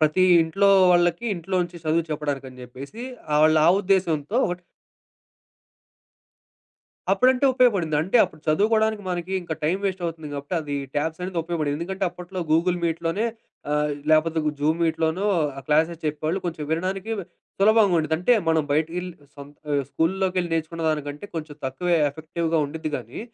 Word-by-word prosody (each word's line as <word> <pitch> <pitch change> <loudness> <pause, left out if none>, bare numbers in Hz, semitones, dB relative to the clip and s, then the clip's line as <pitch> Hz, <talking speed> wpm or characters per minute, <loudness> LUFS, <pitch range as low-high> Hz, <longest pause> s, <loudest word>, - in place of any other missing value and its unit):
ప్రతి 155 +4 +3 0.2
ఇంట్లో 195 +5 +2 0.2
వాళ్ళకి, 175 +6 +2
ఇంట్లో 185 +2 -3
నుంచి 175 0 -7
చదువు 160 +1 +1
చెప్పడానికి 145 -3 -3
అని 130 0 -14
జెప్పేసి, 135 - -9 0.3
ఆ - - +3
వాళ్ళ 155 0 +5
ఆ - - +8
ఉద్దేశంతో 185 -1 0
ఒకటి 180 0 -4 2.5
అప్పుడంటే 255 +1 +3
ఉపయోగపడింది. 195 - +2
అంటే 190 +9 +2
అప్పుడు 155 - -6
చదువుకోవడానికి 215 +5 +2
మనకి 175 +1 -3
ఇంకా 170 -2 -4
టైమ్ 180 +6 +1
వేస్ట్ 190 -2 -2
అవుతుంది 160 -2 -5
గాబట్టి 145 +5 -4
అది 145 -2 -4 0.2
ట్యాబ్స్ 160 +3 -1
అనేది 180 -2 -3
ఉపయోపడింది. 155 -4 -2
ఎందుకంటే 190 +3 -4
అప్పట్లో 180 +1 -8
గూగుల్ 175 +2 +2
మీట్‌లోనే 170 +5 -1 0.5
ఆహ్, 150 0 +1 0.2
లేపోతే 160 +1 +3 0.2
జూమ్ 155 +3 +1
మీట్‌లోనో 160 +3 0 0.4
క్లాసెస్ 160 +2 +2
చెప్పేవాళ్ళు, 155 +5 -1
కొంచెం 165 -3 -4
వినడానికి 190 +6 -2 0.5
సులభంగా 210 -2 +5
ఉండిద్ది. 160 0 +1
అంటే 245 +7 +4 0.2
మనం 160 -2 +3
బయటికేళ్లి 170 +4 -1 0.2
సొంత 140 +1 -11 0.2
ఆ - - +2
స్కూల్లోకెళ్ళి 180 +1 0
నేర్చుకున్న 165 +1 -3
దానికంటే, 150 +2 -4
కొంచెం 155 -2 -5
తక్కువే 170 +7 0
ఎఫెక్టివ్‌గా 160 +2 -2
ఉండిద్ది 155 +2 -5
గానీ, 120 +1 -9
165 Hz, 145 wpm, -24 LUFS, 155-185 Hz, 2.5 s, ఆ